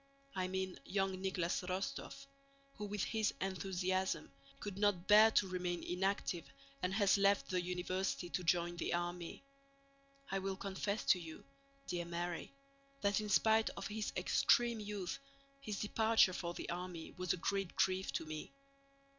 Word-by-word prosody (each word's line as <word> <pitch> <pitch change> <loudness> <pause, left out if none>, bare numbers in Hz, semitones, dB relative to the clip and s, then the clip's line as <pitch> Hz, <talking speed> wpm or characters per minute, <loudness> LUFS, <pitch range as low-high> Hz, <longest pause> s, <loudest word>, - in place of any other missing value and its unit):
I 185 -1 0
mean 190 0 -3
young 195 0 0
Nicholas 185 -3 0
Rostóv, 195 +9 -4 0.5
who 210 - -4
with 205 -1 -2
his 220 -2 0
enthusiasm 190 0 -1 0.3
could 200 -2 -5
not 200 -4 +2
bear 215 +2 +9
to 195 - +4
remain 180 -1 -2
inactive 185 -1 -1 0.3
and 180 - 0
has 200 -1 +4
left 200 0 +3
the 180 -1 +2
university 180 -2 -2
to 180 - -1
join 175 0 +2
the 170 - 0
army. 175 +4 -4 0.9
I 195 - +1
will 195 0 -2
confess 200 +2 -2
to 185 - +4
you, 160 -2 -9 0.4
dear 175 -1 -2
Mary, 170 0 -3 0.5
that 200 +1 +2
in 210 - -4
spite 220 +2 +4
of 195 - -4
his 210 0 -2
extreme 235 -2 +3
youth 205 -2 -4 0.4
his 215 -7 -4
departure 220 -2 +4
for 175 -1 -3
the - - -5
army 175 -2 -5
was 180 -1 -1
a - - -3
great 195 +1 -1
grief 190 0 +2
to - - -1
me. 155 0 -6
190 Hz, 155 wpm, -37 LUFS, 180-205 Hz, 0.9 s, bear